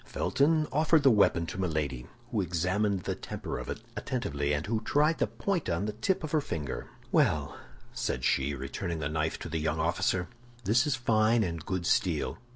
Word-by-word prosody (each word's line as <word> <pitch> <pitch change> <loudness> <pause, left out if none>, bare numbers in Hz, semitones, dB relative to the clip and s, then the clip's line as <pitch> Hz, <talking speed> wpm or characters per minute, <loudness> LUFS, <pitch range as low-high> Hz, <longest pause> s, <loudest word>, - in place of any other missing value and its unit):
Felton 155 +2 +2
offered 155 +2 +3
the 135 - +7
weapon 100 -5 +4
to 90 - -6
Milady, 75 -8 -2 0.2
who 110 - +1
examined 90 +3 0
the - - -1
temper - - -5
of - - -7
it - - -4
attentively, 70 0 -2
and 75 +2 0
who 110 +1 -1
tried 150 +7 +2
the - - +2
point 195 -5 -2
on 85 +4 0
the 105 - -2
tip 170 - 0
of 155 - -4
her 155 - +3
finger. 75 - -4 0.2
"Well," - - +2 0.4
said 65 - -2
she, 70 +2 +1
returning 75 +6 -4
the 75 -2 -2
knife 80 +1 -1
to - - -7
the 80 - -2
young 80 0 -1
officer, 85 +3 +1 0.4
"this 115 +7 +3
is 145 - +2
fine 110 -1 +3
and 85 -4 -3
good 95 0 -2
steel. 85 -1 +1
95 Hz, 190 wpm, -30 LUFS, 80-120 Hz, 0.4 s, the